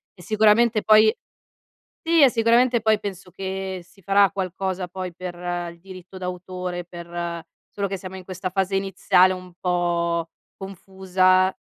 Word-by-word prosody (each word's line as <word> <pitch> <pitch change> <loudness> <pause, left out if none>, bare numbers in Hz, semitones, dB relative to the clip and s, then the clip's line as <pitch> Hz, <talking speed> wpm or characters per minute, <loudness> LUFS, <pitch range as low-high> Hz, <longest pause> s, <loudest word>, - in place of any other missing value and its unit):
e 180 - -15
sicuramente 215 +2 +3
poi 215 +1 +6 0.9
sì, 330 -1 +3
e 270 - +8
sicuramente 235 0 +3
poi 220 -1 +2
penso 195 -3 -7
che 190 0 -5
si 195 +3 -23
farà 200 +2 +4
qualcosa 190 -1 -3
poi 185 0 -6
per 180 0 -7 0.4
il 170 - -17
diritto 185 0 -12
d'autore, 180 -1 -5
per 170 -1 -6 0.3
solo 200 -1 -3
che 195 0 -4
siamo 185 0 -9
in 190 - -9
questa 185 0 -5
fase 195 0 0
iniziale 185 -1 +3
un 185 0 -9
po' 170 -2 0 0.3
confusa. 185 -1 +1
185 Hz, 145 wpm, -23 LUFS, 180-200 Hz, 0.9 s, e